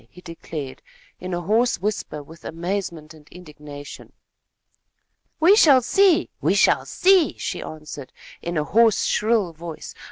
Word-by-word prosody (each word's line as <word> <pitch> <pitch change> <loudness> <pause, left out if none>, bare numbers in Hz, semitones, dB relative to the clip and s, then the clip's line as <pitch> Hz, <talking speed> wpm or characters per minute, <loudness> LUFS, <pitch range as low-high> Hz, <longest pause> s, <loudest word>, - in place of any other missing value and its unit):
he 180 - -16
declared, 165 -5 -8 0.4
in 185 +1 -6
a 175 - -2
voice 220 +7 +1
hoarse 210 +4 -2 0.2
with 160 +2 -15
amazement 170 -2 -5
and 155 -1 -19
indignation. 150 -4 -12 1.3
"We 350 +6 +6
shall 275 - +6
see! 375 +4 +3
We - - +1
shall - - +3
see!" 370 -4 +3
she - - -4
answered, 150 -3 -9 0.3
in 170 0 -4
a 150 - +1
hoarse, 225 +5 +3
shrill 210 -5 +1
voice. 165 0 -9
175 Hz, 135 wpm, -22 LUFS, 155-230 Hz, 1.3 s, We